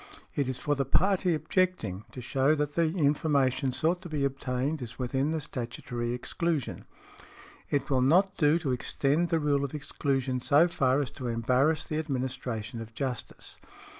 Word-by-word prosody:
It 140 -3 0
is 130 - -2
for 145 - 0
the 140 -1 +1
party 180 +5 +2
objecting 155 - -1
to 125 - -7
shew 135 +4 +2
that 145 -1 -1
the 165 -1 +2
information 140 -5 +2
sought 165 +7 0
to 175 - -8
be 145 -3 0
obtained 135 +2 -2
is 120 -3 -7
within 130 +3 0
the 160 0 -1
statutory 120 -3 -4
exclusion. 155 +3 -2 0.8
"It 140 -2 0
will 130 -2 +3
not 185 +9 +4
do 150 0 +4
to 155 -6 -2
extend 140 +6 0
the 165 - +2
rule 145 -2 +1
of 140 +1 -3
exclusion 135 -3 -1
so 150 +7 +5
far 135 -4 +2
as 140 - -3
to 130 - -6
embarrass 125 +7 +2
the 155 - -2
administration 125 -5 -3
of 115 0 -10
justice. 130 -4 -5
140 Hz, 165 wpm, -29 LUFS, 125-155 Hz, 0.8 s, so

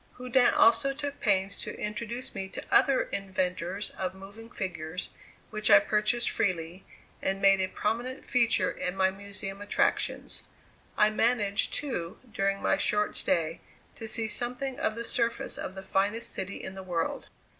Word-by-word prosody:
Houdin 250 0 +4
also 230 +4 +5
took 285 0 -5
pains 195 -2 +1
to - - -6
introduce 230 +4 -4
me 190 -1 -4
to - - -7
other 270 -2 +5
inventors 185 0 -2
of 185 0 -4
moving 200 +4 -11
figures 180 -5 -4 0.4
which 215 0 0
I 205 - +10
purchased 215 +4 +2
freely, 180 -2 -1 0.4
and 195 0 0
made 195 -1 +5
a 185 - +1
prominent 235 +7 -2
feature 235 -3 +3
in 180 0 -3
my 190 0 +3
Museum 200 0 -4
attractions. 205 - 0 0.5
I 210 0 +5
managed, 215 -3 +2
too, 215 -10 -3 0.2
during 195 -1 0
my - - +3
short 210 0 +1
stay, 165 -2 +1 0.3
to 225 - -8
see 220 +1 0
something 250 +4 -2
of 215 - 0
the 235 - -4
surface 235 0 -1
of 190 - -5
the 190 - -7
finest 205 +5 0
city 190 +1 -5
in 190 - -6
the 190 - -7
world. 175 -3 -2
205 Hz, 155 wpm, -29 LUFS, 190-230 Hz, 0.5 s, I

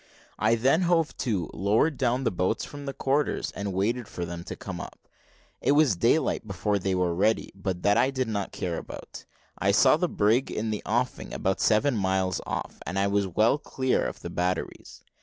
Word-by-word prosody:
I 110 +2 +3
then 135 +9 +3
hove 165 -3 +2
to, 100 -10 -1
lowered 110 +10 +2
down 125 0 0
the - - +1
boats 95 +4 -1
from 145 -1 -9
the - - -1
quarters, 140 +3 0
and 100 0 -4
waited 110 +5 -1
for 90 - -5
them 85 0 -6
to - - -6
come - - -6
up. - - -11 0.5
It 140 - +3
was 145 -8 +4
daylight 115 - +1
before 100 +1 -1
they 95 0 -1
were 90 -2 +1
ready, 105 +6 +1
but 95 -2 -4
that 100 +1 +4
I 125 +3 +4
did 130 -2 -1
not 100 -3 -2
care 85 -2 -3
about; - - -10 0.3
I - - +1
saw - - +5
the - - 0
brig 110 +6 +2
in 110 0 -2
the 105 - -3
offing 120 +3 -1
about 95 0 -1
seven 120 +5 +3
miles 95 -2 0
off, - - -4
and 90 +3 -3
I 100 - +2
was 100 0 +1
well 110 - +2
clear 130 -2 0
of - - -7
the 85 - -6
batteries. 90 +1 -3
105 Hz, 200 wpm, -27 LUFS, 95-125 Hz, 0.5 s, saw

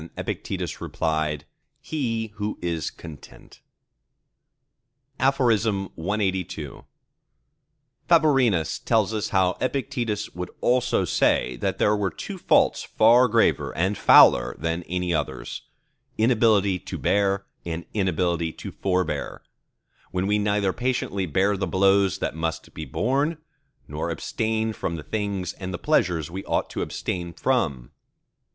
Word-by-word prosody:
_ 80 - -10
Epictetus - - -4
replied, 80 -2 -2 0.3
"He 115 -8 -3
who 105 0 -3
is 85 -4 -2
content." 80 -3 -13 1.6
CLXXXIII 100 - 0 1.2
Favorinus 135 - +3
tells 110 -2 +2
us 105 -2 -2
how 95 -1 +2
Epictetus 125 -6 -2
would 90 +1 -5
also 125 -5 +2
say 65 -5 +2
that - - -2
there 105 - +3
were 100 -2 0
two - - -7
faults - - +3
far 120 +3 +5
graver 115 0 +1
and 95 +4 +1
fouler - - +6
than 80 +3 -2
any 90 -1 -1
others—inability 110 +2 -1
to - - -7
bear, 100 -1 +1 0.2
and 85 0 -5
inability 85 -4 0
to - - -8
forbear, 95 -1 -2 0.7
when 90 +1 -1
we 105 +1 +2
neither 100 -2 +1
patiently 120 -6 -1
bear 95 +6 +2
the 95 -1 -2
blows 95 +2 +3
that - - -2
must 80 0 -4
be 80 - -6
borne, 140 - 0 0.5
nor 75 +3 -4
abstain 110 +6 -1
from 85 - -3
the 80 - -7
things 100 -3 -3
and 95 -1 -6
the 85 - -3
pleasures 90 - +1
we 95 +2 -5
ought - - -1
to - - -3
abstain 85 -1 -3
from. 75 - -1
95 Hz, 120 wpm, -24 LUFS, 85-110 Hz, 1.6 s, fouler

